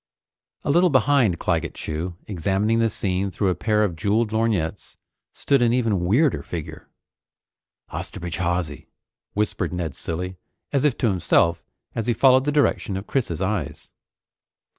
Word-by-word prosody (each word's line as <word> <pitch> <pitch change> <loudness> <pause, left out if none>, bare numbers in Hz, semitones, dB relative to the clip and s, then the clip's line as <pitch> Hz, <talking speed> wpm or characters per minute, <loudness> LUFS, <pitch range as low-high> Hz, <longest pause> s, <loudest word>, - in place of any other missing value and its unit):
A - - +1
little 175 +4 +4
behind 130 - +3
Claggett - - -1
Chew, 80 +3 -4
examining 100 +4 0
the 115 0 +3
scene 95 -2 -1
through 95 +1 0
a - - +2
pair 105 +5 +1
of 95 -5 -1
jeweled 105 +5 +1
lorgnettes, 110 -8 -1 0.3
stood 140 -3 +1
an 120 -1 +3
even 110 -8 +1
weirder 130 - +3
figure. 80 -4 -7 1.0
"Osterbridge 85 -2 -5
Hawsey," 85 -4 -2 0.5
whispered 105 -4 -1
Ned 85 -5 -3
Cilley, 90 +2 -4 0.4
as 140 0 +2
if 140 -4 +2
to 120 - +1
himself, 85 -3 +2 0.3
as 115 0 -3
he 120 - +2
followed 130 +2 +5
the 145 - +1
direction 140 -9 +1
of 95 - -6
Chris's 95 - -1
eyes. 95 -7 -3
100 Hz, 145 wpm, -23 LUFS, 90-120 Hz, 1.0 s, followed